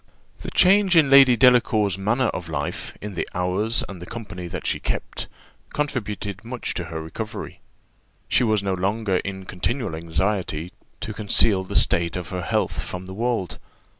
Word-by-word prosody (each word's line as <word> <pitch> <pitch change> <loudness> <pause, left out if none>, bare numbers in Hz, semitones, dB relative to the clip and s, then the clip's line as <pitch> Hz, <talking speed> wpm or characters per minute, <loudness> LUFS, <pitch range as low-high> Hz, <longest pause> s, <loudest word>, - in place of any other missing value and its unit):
The - - -5
change 190 -1 +5
in 145 -4 +5
Lady 135 -3 +8
Delacour's 115 -6 +4
manner 115 +6 +1
of 85 -2 -5
life, 75 -2 -4
in 105 -1 -6
the 85 - -3
hours 95 +6 +1
and 95 -4 -9
the 90 - -8
company 100 -6 -7
that 90 0 -6
she - - 0
kept, - - -3 0.5
contributed 105 -8 -3
much 120 +1 -4
to 90 - -4
her 80 -2 -5
recovery. 80 - -7 0.7
She - - +3
was 110 -3 +2
no 95 -1 0
longer 95 +1 0
in 95 0 -5
continual 110 +4 -2
anxiety 85 0 -2 0.3
to 110 - -4
conceal 105 -2 +4
the 95 - -7
state 85 -1 +2
of 90 -2 -5
her 90 -1 -3
health 85 - -1
from 90 +1 -6
the 95 - -8
world. 115 -4 -2
100 Hz, 165 wpm, -23 LUFS, 90-115 Hz, 0.7 s, Lady